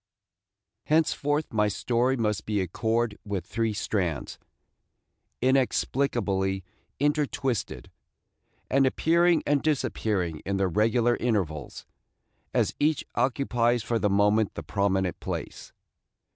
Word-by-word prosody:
HENCEFORTH 150 -2 +1
my 105 -1 +3
story 120 +6 0
must 105 -3 -1
be 105 -1 0
a 95 - -1
cord 110 +4 -1
with 100 -5 -4
three 115 +1 -1
strands, 90 -7 -2 1.0
inexplicably 120 -7 +1 0.4
intertwisted, 140 -5 -1 0.8
and 135 0 +3
appearing 170 +4 +3
and 145 -1 +2
disappearing 110 - -1
in 100 +1 -1
their 95 -1 +1
regular 115 +5 +2
intervals, 90 - -2 0.7
as - - +1
each 150 0 +1
occupies 120 -3 +1
for 115 0 0
the 105 - +1
moment 105 +2 +2
the - - -5
prominent 95 -3 0
place. - - -6
115 Hz, 105 wpm, -27 LUFS, 100-135 Hz, 1.0 s, my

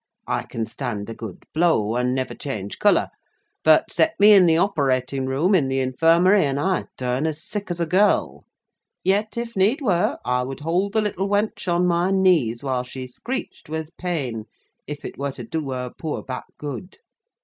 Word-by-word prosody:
I - - -1
can 115 -1 -4
stand 115 -4 -5
a - - -5
good 110 -5 -9
blow, 155 -10 +2
and 125 +1 +1
never 130 -1 -2
change 105 -8 -6
colour; 205 - +3 0.5
but, - - +5
set 320 - +1
me 210 +1 +8
in 190 -3 +7
the 160 -1 +4
operating 135 -7 0
room 150 +9 +1
in 155 -8 +3
the 135 0 0
infirmary, 165 +9 +4
and 140 -1 0
I 185 +3 0
turn 125 +4 -1
as 155 +1 -4
sick 205 -2 -5
as 175 -1 -3
a 170 - +1
girl. 195 +5 +2 0.6
Yet, 205 +4 +1
if 235 -1 -4
need 205 +9 +3
were, 190 - +1
I 125 0 +1
would 135 +3 -5
hold 180 +6 0
the 220 - +3
little 200 -2 -2
wench 205 -2 0
on 175 +1 +2
my 175 +1 +2
knees 175 -12 +2
while 130 -2 0
she 130 +1 -7
screeched 240 - -6
with 160 +1 -5
pain, 135 -12 -3 0.4
if 145 0 -7
it - - -8
were 140 -1 -2
to 125 - -8
do 150 +4 -4
her 125 -1 -4
poor 160 -2 -4
back 130 -1 -6
good. 150 +5 -7
160 Hz, 190 wpm, -23 LUFS, 130-190 Hz, 0.6 s, me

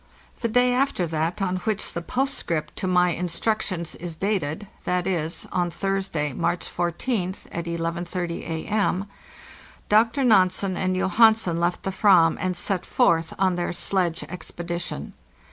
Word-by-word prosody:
* - - -26
The 235 - +1
day 245 +2 +3
after 255 -8 +1
that 165 +4 -1
on 185 -1 0
which 215 +3 -2
the 170 - -3
postscript 210 - -1
to 185 - -2
my 180 -1 +3
instruc 180 +6 0
tions 170 -4 -3
is 170 -1 -6
dated—z.¢c., 180 -2 -2
on 175 -1 0
Thursday, 190 -6 -2
March 175 - -1
14th, 180 +2 -2
at 170 - -4
11.30 170 +1 -3
A.M.— 195 +3 0 0.8
Dr. 225 +6 +4
Nansen 190 -4 +3
and 185 +1 0
Johansen 190 -2 +4
left 175 +1 0
the 195 - -1
"vam 180 -5 +5
and 185 -1 -1
set 185 0 -1
forth 165 -1 +2
on 190 -1 +2
their 175 0 -1
sledge 175 -1 0
expedition. 175 - -5
180 Hz, 140 wpm, -24 LUFS, 170-200 Hz, 0.8 s, vam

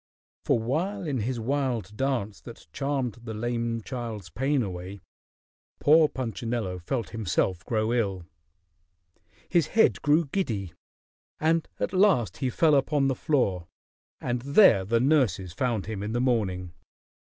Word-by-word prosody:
For - - +3
while 170 - -2
in 140 -5 -1
his 120 +3 -2
wild 120 -5 -2
dance 110 - -2
that - - -12
charmed 135 - -2
the 110 -2 -6
lame 115 0 -2
child's 115 -8 -6
pain 135 0 +1
away, 95 0 -6 0.8
poor 155 +1 +5
Punchinello 115 -6 -3
felt 115 +7 -3
himself 95 -4 -1
grow 110 0 0
ill. 100 -7 -1 1.2
His 170 -2 +2
head 225 - +3
grew 155 +3 +3
giddy, 110 - -3 0.7
and 160 +1 +1
at - - -2
last 185 - +3
he 130 -2 -1
fell 155 +4 +3
upon 140 0 +2
the - - +1
floor, 100 - 0 0.5
and 120 0 -2
there 140 - +5
the 115 +4 +2
nurses 115 - +2
found 115 0 -1
him 105 -1 -5
in 105 +2 -3
the 120 - 0
morning. 95 -8 0
120 Hz, 140 wpm, -27 LUFS, 105-140 Hz, 1.2 s, poor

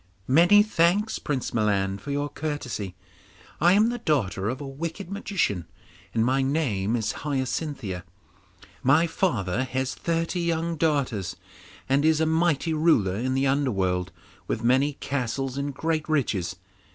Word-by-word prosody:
'Many 175 +9 +6
thanks, 205 +2 +2
Prince 135 -4 -3
Milan, 100 -3 +1
for 145 - -9
your 145 +1 -1
courtesy. 125 -12 -4 0.6
I 175 +1 +5
am 215 +3 +4
the 240 0 -3
daughter 105 - 0
of 130 +2 -3
a 145 - -6
wicked 165 +7 -6
magician, 190 - -1 0.4
and 115 0 +1
my 130 +2 +2
name 125 -7 0
is 110 -3 0
Hyacinthia. 130 - -3 0.8
My 145 +6 +4
father 125 - 0
has 130 0 -2
thirty 165 +1 -1
young 170 0 0
daughters, 140 - 0 0.5
and 140 +2 +2
is 160 0 +4
a 160 - +3
mighty 160 -1 +1
ruler 155 - +3
in 130 +5 -1
the 135 +1 +2
underworld, 95 -10 0 0.4
with 110 - -2
many 130 +4 +3
castles 135 -1 -3
and 140 +1 -2
great 160 +2 -2
riches. 110 - 0
140 Hz, 140 wpm, -26 LUFS, 115-160 Hz, 0.8 s, Many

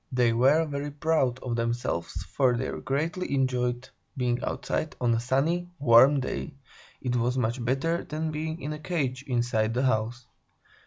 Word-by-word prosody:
They 125 -2 +3
were 135 +7 +4
very 145 -1 -4
proud 145 -4 +1
of 120 -2 -2
themselves, 115 -7 -2
for 125 +4 +1
they 130 +2 -2
greatly 155 +3 -2
enjoyed 125 -1 0 0.3
being 125 -1 0
outside 155 +3 -2
on 120 -2 +2
a 115 - +1
sunny, 150 +9 0
warm 135 +1 +6
day; 135 +2 -4 0.5
it 125 -1 -1
was 120 +2 +1
much 120 0 -1
better 135 +8 0
than 155 +1 -3
being 160 +2 -4
in 150 +2 -3
a 150 - -7
cage, 145 -6 -2
inside 120 -3 0
the 130 - +1
house. 120 +1 0
130 Hz, 160 wpm, -27 LUFS, 120-150 Hz, 0.5 s, warm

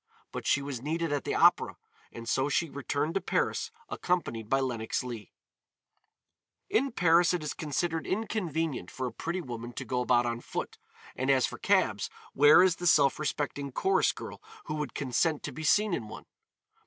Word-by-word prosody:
But - - -5
she 140 - +2
was 135 -4 -5
needed 160 +2 -1
at 145 - -2
the - - -1
Opéra - - +4 0.4
and 115 0 -9
so 135 +4 +1
she 150 +2 0
returned 145 +3 -2
to 195 - 0
Paris - - -1 0.2
accompanied 115 -12 -2
by 135 - +3
Lenox 120 -4 -2
Leigh. 115 -6 -7 1.4
In 275 +3 +2
Paris 175 -3 +4
it 170 - -4
is 150 - -3
considered 160 +2 -2
inconvenient 165 - -2
for 130 - -4
a 125 - -3
pretty 170 +8 -3
woman 120 -4 -7
to - - -6
go 125 -1 -1
about 120 -1 +3
on 120 0 -2
foot, - - -5 0.4
and 130 +2 -2
as 130 -2 +4
for - - -6
cabs, - - +2 0.2
where 145 +5 +7
is 185 -3 +3
the 175 - -2
self 140 -4 +4
respecting 145 -2 -2
chorus 385 - +2
girl - - -9 0.2
who - - -4
would 150 -1 -4
consent 145 +4 0
to - - -4
be 155 - -8
seen 205 +6 +3
in 110 - -2
one? - - -10
145 Hz, 180 wpm, -29 LUFS, 125-165 Hz, 1.4 s, where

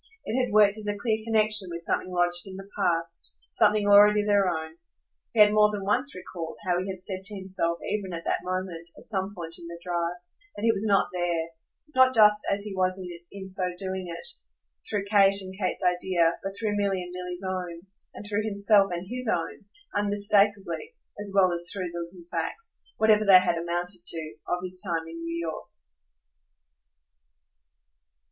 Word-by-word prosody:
It 225 - -3
had 250 - -3
worked 210 0 +5
as 210 - -6
a 205 0 -1
clear 220 +1 0
connexion 215 -3 +2
with 170 0 -6
something 185 - -1
lodged 175 0 +1
in 190 - -8
the 195 +1 -9
past, 165 - -2 0.2
something 210 -1 +3
already 205 +1 +6
their 200 -2 +3
own. 160 -1 -4 0.5
He 230 - -2
had 210 0 +7
more 210 0 +5
than 200 -2 -4
once 250 +8 0
recalled 175 -3 -7
how 180 -1 +1
he 190 - -5
had 190 -1 -6
said 190 -1 -4
to 205 +1 -2
himself 185 -3 -2
even 200 -3 -2
at 170 -1 -6
that - - -1
moment, 180 -2 -4
at - - -15
some 195 -1 -2
point 165 -2 -5
in 170 - -9
the 170 0 -8
drive, 175 -1 -1 0.4
that 205 - -7
he 230 - +5
was 220 0 -2
not 200 -1 +3
THERE, 170 -2 -1 0.4
not 260 -1 +5
just 210 -1 +6
as 200 0 0
he 210 -1 -5
was 185 0 0 0.3
in 195 -1 -8
so 185 -1 0
doing 190 0 -3
it, 170 0 -7 0.6
through 200 -1 -1
Kate 200 -1 +5
and 190 -1 -3
Kate's 190 -1 -2
idea, 180 -2 +2
but 195 0 -4
through 210 0 -1
Milly 200 -2 0
and 180 0 -9
Milly's 180 0 -6
own, 180 -3 -4 0.3
and - - -9
through 205 0 -1
himself 200 -2 +3
and 175 +1 -4
HIS 250 +2 -4
own, 215 - -2 0.3
unmistakeably 205 - +1 0.2
as 205 -1 -4
well 185 -2 +5
as 170 0 0
through 185 -3 -3
the 170 0 -5
little 175 -2 -15
facts, 180 - -5
whatever 215 -1 +4
they 195 -3 +9
had 180 -2 +1
amounted 175 +2 -2
to, 160 -2 -2
of 180 0 -2
his 185 0 -4
time 165 -4 -2
in 165 0 -8
New 165 0 -3
York. 165 -2 -5
190 Hz, 190 wpm, -27 LUFS, 175-205 Hz, 0.6 s, they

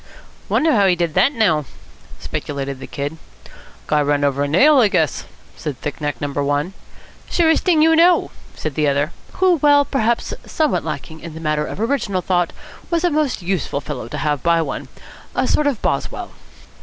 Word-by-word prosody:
"Wonder 320 +1 +3
how 200 -4 +4
he 180 - +4
did 170 -2 -1
that, 275 - +4
now?" 195 - +2 0.5
speculated 140 -2 -4
the - - -8
Kid. 145 +3 -4 0.7
"Guy 150 -1 +2
ran 145 0 +1
over 140 -1 +1
a - - 0
nail, 270 - +5
I 230 - +6
guess," 160 -7 0 0.3
said 145 -4 -5
thick 150 +1 -5
neck 145 0 -2
number 145 0 -2
one. 145 +6 -1 0.6
"Surest 320 -2 +3
thing 330 -4 +4
you 325 0 +5
know," 345 +2 +4 0.2
said 155 - -4
the 150 +1 +1
other, 140 +3 +1 0.2
who, 370 -2 +3
while 290 -1 +4
perhaps 235 -4 0
somewhat 310 -3 0
lacking 160 +1 -6
in 165 -1 -9
the - - -7
matter 150 -1 -1
of - - -7
original 220 -6 -1
thought, 175 -2 +1 0.4
was 335 -1 0
a 355 - +2
most 295 -10 0
useful 175 -6 -1
fellow 145 -6 -6
to - - -6
have 150 -2 -1
by 170 0 +3
one. 165 - -3 0.5
A - - +1
sort 300 - +2
of 275 -6 0
Boswell. - - -2
170 Hz, 185 wpm, -20 LUFS, -, 0.7 s, I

